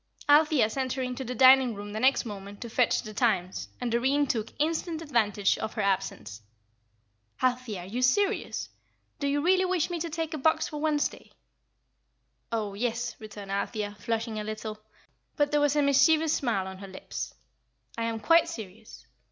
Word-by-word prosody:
Althea 295 -4 +5
sent 255 +3 -2
her 260 - -2
into 250 +1 -4
the 250 0 -5
dining 260 -1 +6
room 205 +1 -7
the 215 - -3
next 265 +2 +3
moment 200 -2 -8
to 235 - -7
fetch 250 +1 +2
the 215 -2 -8
Times 195 -6 0
and 245 -2 -2
Doreen 265 +5 +2
took 225 -5 -2
instant 320 +1 -1
advantage 220 -10 +1
of 220 - -4
her 215 - -1
absence. 110 - -2 1.0
"Althea, 250 -6 -1
are - - -9
you 230 +7 -4
serious? 400 - +1 0.5
Do 280 - -1
you 285 +1 +1
really 370 +2 +4
wish 365 -2 0
me 345 - -2
to 335 +1 -3
take 325 0 -3
a 310 - -3
box 315 +4 +2
for 300 -1 -6
Wednesday?" 300 -2 -1 1.2
"Oh, 215 -3 -2
yes," 240 +3 -2
returned 210 -2 -9
Althea, 205 +1 -2
flushing 225 0 -2
a - - -3
little; 215 0 -5 0.6
but 290 0 +1
there 295 0 +3
was 290 0 +2
a 295 - +3
mischievous 310 +3 +4
smile 225 -8 0
on 190 0 -8
her 195 - -8
lips, 190 0 -7 0.6
"I 230 - -2
am 225 -1 -2
quite 335 +6 +4
serious. 220 - -10
245 Hz, 175 wpm, -28 LUFS, 215-290 Hz, 1.2 s, dining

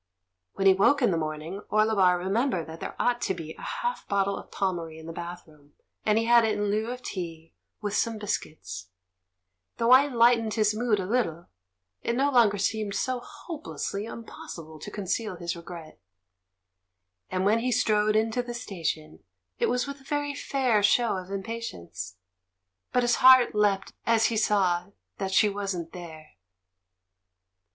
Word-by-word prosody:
When 195 - -2
he 190 - +8
woke 270 +9 +3
in 230 - +4
the 170 - +1
morning, 155 +4 -4
Orlebar 210 -4 +4
re 180 +1 -4
membered 210 - +1
that 160 +2 -9
there - - -6
ought 245 0 +1
to 190 - 0
be 160 -2 -7
a - - -14
half 485 0 -3
bottle 200 0 +1
of - - -9
Pommery 170 -5 -2
in 160 - -11
the 165 - -7
bathroom, 165 -4 -9 0.3
and 215 0 +3
he 225 - +2
had 235 0 +6
it 220 - +1
in 205 -1 0
lieu 215 +2 0
of 250 0 -6
tea, 165 -5 -6 0.3
with 205 -1 -2
some 230 -1 0
biscuits. 95 - -5 0.9
The 230 - 0
wine 260 +3 +6
lightened 230 -2 +4
his 215 -2 +3
mood 220 -1 +1
a 185 - -2
little; 180 -7 -1 0.5
it 235 - -1
no 275 +3 +2
longer 225 -6 +4
seemed 205 +1 -1
so 255 -1 -1
hopeless 315 +5 -6
ly 205 +3 -4
impossible 160 -8 -9
to 210 - -7
conceal 210 0 -2
his 170 0 -4
regret; 170 - -10 1.3
and 185 +1 -1
when 215 +3 +4
he 250 +2 -1
strode 215 -3 +2
into 225 +3 +2
the 240 -1 -6
station, 165 -9 -4 0.4
it 470 - +2
was 250 - +1
with 280 -1 -7
a - - -18
very 290 +1 -2
fair 260 -6 +1
show 225 +2 +3
of 185 0 -7
impatience. 190 - -6 0.8
But 250 - +2
his 240 0 +3
heart 260 -1 +7
leapt 205 -2 +1
as 225 -1 +4
he - - 0
saw 185 -5 +2 0.3
that 195 -1 -2
she 210 +3 +5
wasn't 195 -5 -3
there. 160 - -10
205 Hz, 170 wpm, -27 LUFS, 175-235 Hz, 1.3 s, he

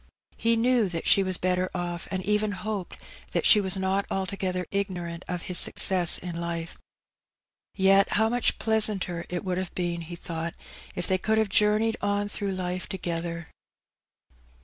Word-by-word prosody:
He 230 0 +2
knew 235 -2 +2
that 165 -2 -4
she 195 - +6
was 185 -1 -1
better 185 0 0
off, 175 -1 -4
and 190 -1 -3
even 210 0 +1
hoped 200 -1 -5 0.4
that - - 0
she 210 - +6
was 190 -1 +3
not 190 +1 -1
altogether 190 -1 -2
ignorant 180 -4 -3
of 180 -2 -4
his 180 -2 +3
success 180 -3 +5
in 175 -1 -7
life. 170 -1 -4 1.0
Yet 195 0 +4
how 220 +1 +3
much 245 +1 0
pleasanter 210 -6 +1
it 180 +2 -4
would 185 -1 -1
have 185 -1 -6
been, 175 -1 -2
he 170 +1 -8
thought, 170 0 -6 0.4
if - - -1
they 185 0 +1
could 220 +3 0
have 220 -2 +1
journeyed 210 +3 +2
on 205 0 -1
through 200 -1 -3
life 180 0 -4
together. 170 -3 -4
185 Hz, 165 wpm, -26 LUFS, 175-205 Hz, 1.0 s, she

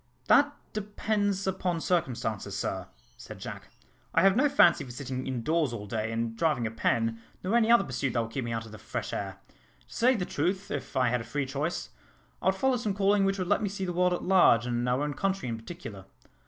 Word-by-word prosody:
"That 290 0 +5 0.2
depends 205 -1 -1
upon 180 -2 -1
circumstances, 115 - -1
sir," 95 -2 -3 0.3
said - - -10
Jack. - - -8 0.5
"I - - +5
have 195 0 +6
no 285 +5 +4
fancy 275 - +5
for 130 - -10
sitting 130 +1 -5
indoors 135 +3 0
all 105 -3 -5
day, 110 +1 -2
and 115 0 -2
driving 150 -3 +1
a 110 - -2
pen, 115 0 0 0.2
nor 190 +5 0
any 230 -1 +4
other 235 -3 +6
pursuit 130 -3 -2
that 115 - +2
would 115 - -8
keep 130 +2 -2
me 120 - -4
out 115 -1 -3
of 110 - -12
the 110 - -10
fresh - - -5
air. - - -4 0.5
To - - -14
say 255 +3 +4
the 185 -5 -1
truth, 185 +7 -1
if 145 -2 -4
I 125 -2 +3
had 125 0 0
a - - -6
free 145 +3 -2
choice, 145 +6 -3 0.5
I - - -1
would - - +4
follow 265 -2 +2
some 215 -4 -2
calling 200 0 +3
which 195 0 +1
would 185 - -1
let 205 - +2
me 205 - 0
see 195 -1 -4
the 180 - -3
world 180 +1 +2
at 175 - -3
large, 175 - +5
and 120 0 -1
our 125 +3 +1
own 150 0 -2
country 195 0 -1
in 115 - -2
particular. 115 - -9
150 Hz, 230 wpm, -29 LUFS, 115-195 Hz, 0.5 s, have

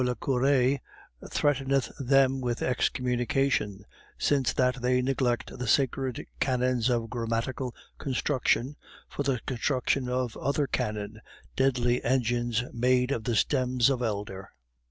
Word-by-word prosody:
le 125 0 0
Cure) 135 +1 +2 0.5
threateneth 135 -2 +1
them 135 0 +3
with 120 -2 -2
excommunication, 125 -4 0 0.3
since 135 -5 +2
that 125 0 +1
they 125 +1 +2
neglect 125 -2 0
the 125 - -3
sacred 130 0 +1
canons 125 -2 +1
of 120 -2 0
grammatical 120 +2 -2 0.3
construction 130 0 0 0.3
for - - -5
the 135 -3 0
construction 130 0 0
of 125 -2 -1
other 140 +2 0
canon, 105 -3 -3 0.3
deadly 125 -2 +2
engines 120 -1 +1
made 125 +2 +2
of 115 -6 -2
the 120 - 0
stems 125 +1 +2
of 130 -2 -1
elder. 100 -4 -3
125 Hz, 120 wpm, -28 LUFS, 120-135 Hz, 0.5 s, them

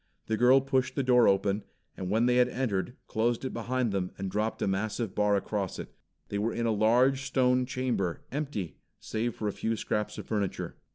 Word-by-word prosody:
The 110 - 0
girl 125 +4 +6
pushed 130 -1 0
the 140 - 0
door 125 -2 +5
open, 100 +1 +2 0.3
and 90 - -5
when 110 +4 +3
they 125 0 +3
had 125 0 +4
entered, 120 -3 -2
closed 115 +3 0
it 130 - -3
behind 120 0 -1
them 95 -2 -1
and 95 -1 -4
dropped 110 +2 -1
a - - +1
massive 105 +2 -1
bar 105 0 +2
across 100 -1 -2
it. - - -8 0.4
They 100 - -2
were 115 +3 -1
in 115 - -1
a 115 - +2
large, 120 +6 +3
stone 130 -2 +2
chamber, 125 -9 -1
empty 135 - -4 0.2
save 115 +1 -2
for 105 - -3
a 105 - -1
few 115 0 -1
scraps 105 0 -2
of - - -6
furniture. 105 -3 -2
115 Hz, 205 wpm, -29 LUFS, 105-125 Hz, 0.4 s, girl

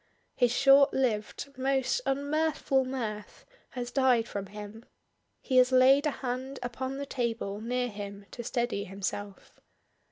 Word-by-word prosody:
His 245 -2 +3
short 275 +2 +6
lived, 255 +2 -1
most 270 - +1
unmirthful 285 -1 +1
mirth 220 -5 -5 0.2
has 245 -1 -5
died 255 -4 +3
from 200 -1 -5
him, 210 +2 -9 0.6
he 260 - +1
has 255 0 +6
laid 265 +3 +5
a 295 - -4
hand 260 +2 -3
upon 260 +2 -4
the 280 - -4
table 225 -6 -3
near 245 +2 -1
him 200 -2 -8
to 240 - -7
steady 235 -4 -1
himself. 200 +1 -6
250 Hz, 135 wpm, -29 LUFS, 215-270 Hz, 0.6 s, short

